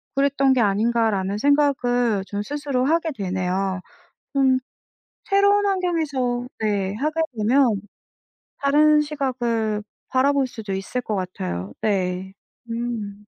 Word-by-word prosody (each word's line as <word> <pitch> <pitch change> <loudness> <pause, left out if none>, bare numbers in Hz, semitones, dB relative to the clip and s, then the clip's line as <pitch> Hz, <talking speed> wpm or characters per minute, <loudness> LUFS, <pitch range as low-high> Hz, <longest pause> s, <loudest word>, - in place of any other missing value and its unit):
그랬던 275 -1 +3
게 255 - +2
아닌가.'라는 205 -2 +1
생각을 245 -5 +2
좀 200 +1 -4
스스로 280 +1 -2
하게 325 +2 +1
되네요. 190 -1 -1 0.5
좀 265 -2 +3 0.6
새로운 405 +1 +3
환경에서 310 -11 0
네. 205 -3 0
하게 305 +7 -1 0.2
되면 230 0 +3 0.8
다른 300 +2 +4
시각을 240 -7 -1 0.3
바라볼 275 +1 +2
수도 220 -5 -7
있을 195 +6 -3
것 215 - -3
같아요. 95 - -4
네. 190 -2 -1 0.4
음. 220 -3 -4
245 Hz, 235 characters per minute, -23 LUFS, 200-280 Hz, 0.8 s, 다른